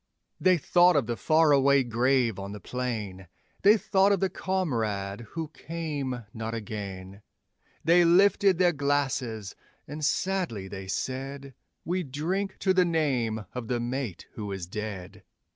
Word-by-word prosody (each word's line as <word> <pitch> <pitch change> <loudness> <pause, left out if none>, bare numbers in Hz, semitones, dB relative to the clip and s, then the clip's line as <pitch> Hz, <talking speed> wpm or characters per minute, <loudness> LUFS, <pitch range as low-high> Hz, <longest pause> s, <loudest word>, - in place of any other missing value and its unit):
They 185 -1 +4
thought 175 +3 +4
of 140 -5 +2
the 120 - -2
far 155 +8 +3
away 140 -1 +5
grave 120 -2 +1
on 100 +1 -6
the 105 - -7
plain, 105 -7 -4 0.3
They 210 +3 +6
thought 195 -1 +3
of 200 - +2
the 190 0 0
comrade 115 - -2 0.2
who 160 -2 -3
came 145 -7 -5
not 115 0 -4
again, 100 -3 -7 0.6
They 170 +2 +5
lifted 190 +2 +4
their 175 -1 +4
glasses, 135 -7 -1 0.3
and 150 +2 -7
sadly 170 - -1
they 95 0 -7
said: 135 +5 -4 0.3
'We 180 +2 0
drink 180 +9 -2
to 190 - +3
the 185 -1 +4
name 130 - 0
of 125 -3 -5
the 120 0 -1
mate 120 -5 -4
who 105 -2 -5
is 95 -3 -4
dead.' 100 -1 -6
135 Hz, 145 wpm, -27 LUFS, 110-170 Hz, 0.6 s, They